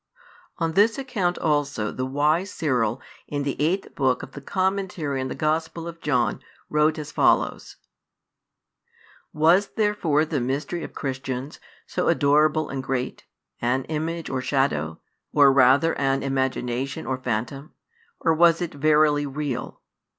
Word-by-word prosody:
ON 165 -2 0
THIS 205 - +3
ACCOUNT 220 -10 -1
ALSO 145 -8 0
THE 130 0 -3
WISE 150 +7 +1
CYRIL, 125 -6 0 0.3
IN 145 -1 -2
THE 140 -1 -2
EIGHTH 185 +5 -1
BOOK 130 -3 +1
OF - - -9
THE 140 - -9
COMMENTARY 185 -5 -1
ON 130 - -2
THE - - -5
GOSPEL 160 +2 -1
OF 170 0 -9
JOHN, 125 -7 +1 0.3
WROTE 150 +1 +3
AS 150 -2 -6
FOLLOWS. - - +1 1.6
"Was 170 +6 +4
therefore 205 -8 +1
the 150 -4 -2
Mystery 140 +7 -2
of - - -9
Christians, 135 0 -4 0.3
so - - -2
adorable 150 +2 +3
and 135 -1 -3
great, 130 -1 -4 0.3
an 125 +3 +1
image 160 +2 -3
or 130 -1 -2
shadow, 105 - 0 0.3
or 140 -2 +6
rather 140 +5 +5
an 135 -1 +1
imagination 130 -1 -2
or 130 +1 -2
phantom: 125 +4 -4 0.5
or 165 - +3
was 170 +1 +5
it 175 -2 -3
verily 150 0 +3
real? 135 -3 -4
145 Hz, 140 wpm, -24 LUFS, 130-160 Hz, 1.6 s, or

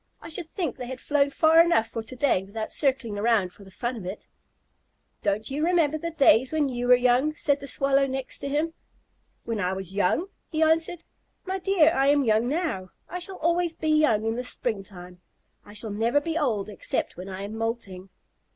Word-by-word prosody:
"I - - -10
should 325 0 -3
think 330 - -3
they 250 - -6
had 260 0 -6
flown 285 0 +1
far 320 +3 +5
enough 280 -10 +2
for 225 - -4
to 225 +3 -8
day 255 -7 +2
without 215 +3 -5
circling 255 -7 0
around 205 -5 +2
for 200 - -15
the 190 - -14
fun 240 +6 -4
of 200 - -8
it." 195 +3 -7 0.9
"Don't 210 +3 -1
you 295 +3 -1
remember 325 -3 +2
the 335 - -3
days 265 -5 +4
when 305 -3 +1
you 245 -1 -3
were 250 - +8
young?" 250 +5 +2
said 285 -1 +1
the 280 - -8
Swallow 275 0 +2
next 265 0 -3
to 280 - -4
him. 305 +3 -1 0.7
"When 230 -2 -3
I 185 -1 0
was 190 -1 -4
young?" 205 - +1 0.2
he 315 -1 +1
answered. 320 +2 +1 0.4
"My 380 0 -2
dear, 355 -4 +4
I 270 +1 +2
am 285 0 +4
young 220 0 +2
now. 290 - -2 0.2
I 360 - -5
shall 370 +1 -9
always 335 +1 0
be 315 - -2
young 300 -9 +3
in 225 +1 -1
the 250 - -2
springtime. 195 -7 -5 0.4
I 205 - -14
shall 215 +1 -3
never 230 +7 +2
be 325 +2 -4
old 240 -11 0
except 210 - -3
when 185 +2 -8
I 190 +1 -6
am 205 +2 -6
moulting." 225 -5 -4
255 Hz, 205 wpm, -26 LUFS, 215-310 Hz, 0.9 s, were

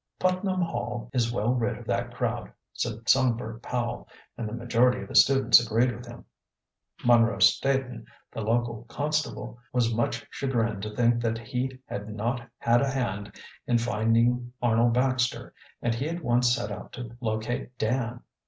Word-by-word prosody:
"Putnam 185 0 0
Hall 120 -6 -4
is 120 -3 +1
well 120 +1 +1
rid 120 -2 -1
of - - -11
that - - -1
crowd," - - -3 0.2
said 115 -1 -4
Songbird 120 -3 +2
Powell, 120 -1 -3 0.3
and 115 -3 -4
the - - -7
majority 120 +1 +2
of - - -9
the - - -8
students 135 -3 +6
agreed 120 +2 +1
with 120 +2 -10
him. 120 - -11 0.8
Munro 115 -3 +5
Staton, 125 +2 +2 0.2
the - - -5
local 115 +1 -1
constable, 140 -3 -3
was 120 -2 +1
much 115 +1 -1
chagrined 115 -6 -1
to 105 +1 -6
think 120 -1 +3
that 115 -1 0
he 125 +3 -3
had 105 +1 -6
not 115 +4 -2 0.2
had 120 +1 +3
a 140 - +1
hand 100 -7 -3 0.3
in 120 - +3
finding 115 +2 +1
Arnold 120 0 +3
Baxter, 125 -1 0 0.3
and 120 - +1
he 135 +7 -2
at 170 0 -5
once 120 0 +3
set 105 - -4
out 100 - -8
to 120 -2 -7
locate 115 +2 -3
Dan. 120 +1 -1
120 Hz, 160 wpm, -27 LUFS, 115-125 Hz, 0.8 s, students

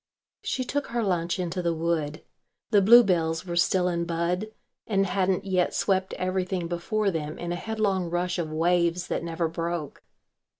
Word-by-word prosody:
She 255 - -2
took 285 +3 -2
her 235 0 -1
lunch 175 -3 0
into 180 0 -2
the 170 -1 0
wood. 160 -2 -2 0.5
The 205 -3 +5
bluebells 185 -7 +5
were 175 -1 -4
still 180 +1 +3
in 170 -1 -1
bud 170 +4 -1 0.4
and 195 -2 +2
hadn't 190 0 0
yet 185 -2 +1
swept 190 -1 0
everything 185 -1 -2
before 195 +4 -1
them 155 -2 -4
in 175 0 -4
a - - -1
headlong 195 -3 -1
rush 175 +1 -1
of 160 -2 -2
waves 170 +2 +1
that - - -1
never 165 0 -1
broke. 165 -2 -4
175 Hz, 165 wpm, -26 LUFS, 170-190 Hz, 0.5 s, The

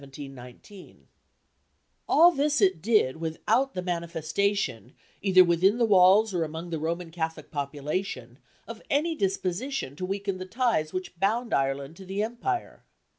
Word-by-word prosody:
All 340 +3 +7
this 295 -2 +1
it 185 -5 +2
did 205 - +2
without 165 +12 0
the 180 - -3
manifestation, 170 - -2 0.3
either 185 -2 +6
within 180 +5 +3
the 240 - +3
walls 200 +1 +5
or 175 -2 0
among 160 +2 -6
the 160 - -2
Roman 165 +2 -3
Catholic 160 -1 -5
population, 145 -3 -4 0.3
of 230 -1 -8
any 310 +4 +1
disposition 195 - -2
to 185 - -3
weaken 195 -1 -3
the 185 - -6
ties 225 -8 0
which 185 -1 -6
bound 225 +5 0
Ireland 135 +3 -1
to 190 - -11
the 195 +2 -1
empire. 240 - -4
185 Hz, 135 wpm, -27 LUFS, 160-220 Hz, 0.3 s, All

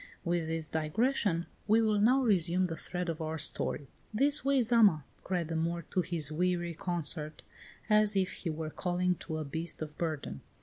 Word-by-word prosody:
With 170 -2 -1
this 160 -1 -2
digression 170 - 0 0.2
we 220 +2 +4
will 215 -2 +2
now 255 +6 +3
resume 185 -4 +2
the 165 -2 -4
thread 180 +3 -5
of 165 -1 -4
our 160 0 -3
story. 145 -1 -1 0.2
"This 280 +7 +6
way, 275 0 +2
Zama!" 215 - +4 0.2
cried 180 -3 -2
the 165 - -3
Moor 170 +1 -2
to 185 - +1
his 165 -5 0
weary 175 +1 -1
consort, 160 -3 -2 0.4
as 215 -1 +4
if 190 -1 +1
he 175 - -6
were 155 0 -5
calling 180 +1 -1
to 155 - -6
a 155 - -4
beast 160 +4 -3
of 155 -1 -7
burden. 150 - -4
175 Hz, 180 wpm, -31 LUFS, 160-205 Hz, 0.4 s, This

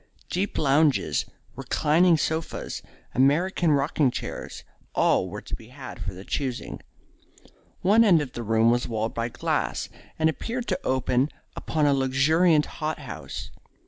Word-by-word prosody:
Deep 190 +3 -1
lounges, 145 0 +2 0.3
reclining 165 +3 +3
sofas, 160 +1 -3 0.3
American 160 +6 +3
rocking 145 0 +2
chairs, - - -6 0.3
all 95 - +3
were 105 +3 -7
to - - -9
be 110 - -13
had 130 +1 -10
for 95 -1 -4
the 95 +2 -10
choosing. 130 -4 -3 1.0
One 210 +5 +5
end 185 -7 +6
of 145 -4 -4
the 120 - -5
room 115 +1 +3
was 120 0 0
walled 110 -1 -2
by 115 +1 -2
glass, - - -2 0.3
and 160 - +3
appeared 235 +9 -3
to - - 0
open 130 +1 +1 0.3
upon 155 -2 0
a 145 - +4
luxuriant 150 +5 +3
hot 155 0 -4
house. - - -7
145 Hz, 145 wpm, -26 LUFS, 125-160 Hz, 1.0 s, end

